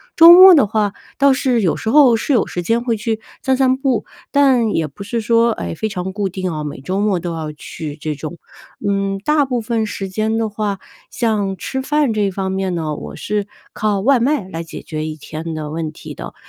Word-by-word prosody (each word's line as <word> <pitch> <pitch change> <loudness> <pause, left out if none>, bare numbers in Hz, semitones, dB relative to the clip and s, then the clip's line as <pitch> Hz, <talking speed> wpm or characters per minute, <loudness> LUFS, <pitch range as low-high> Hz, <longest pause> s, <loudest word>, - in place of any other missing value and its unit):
周 330 +1 +10
末 370 +1 +10
的 275 -10 +5
话 210 -1 0 0.2
倒 275 -1 +5
是 250 -3 +1
有 175 - +1
时 220 - -4
候 265 -3 +6
是 270 +5 -1
有 240 - +3
时 175 - -4
间 230 +7 0
会 235 -2 0
去 220 +1 -2 0.2
散 265 -1 +1
散 260 -1 +3
步， 270 -4 0 0.3
但 265 -5 +3
也 165 -6 0
不 140 - -14
是 230 +4 -3
说， 230 +1 +3
哎， - - -5
非 220 +7 -3
常 190 -1 -4
固 200 -2 -2
定 185 -2 -4
哦， 150 -1 -4
每 145 -2 -6
周 190 +7 -2
末 205 -4 +1
都 170 0 -4
要 155 -2 -4
去 150 0 -8
这 155 0 -4
种。 155 +4 -7 0.5
嗯， 195 0 0
大 300 -1 +3
部 250 -3 -1
分 220 -1 -1
时 195 -1 -5
间 220 +3 -1
的 225 - 0
话， 205 -1 -2 0.3
像 205 -5 -1
吃 265 0 -4
饭 295 -3 +1
这 205 -2 +1
方 190 0 -3
面 190 -1 -2
呢， 155 -2 -2
我 - - -8
是 210 -1 -3 0.3
靠 205 -2 0
外 265 +3 +4
卖 250 -5 0
来 165 -3 -5
解 165 - -9
决 155 -1 -5
一 155 0 -4
天 155 +2 -7
的 150 -1 -5
问 160 -1 -3
题 - - -10
的， - - -9
205 Hz, 240 characters per minute, -18 LUFS, 175-240 Hz, 0.5 s, 周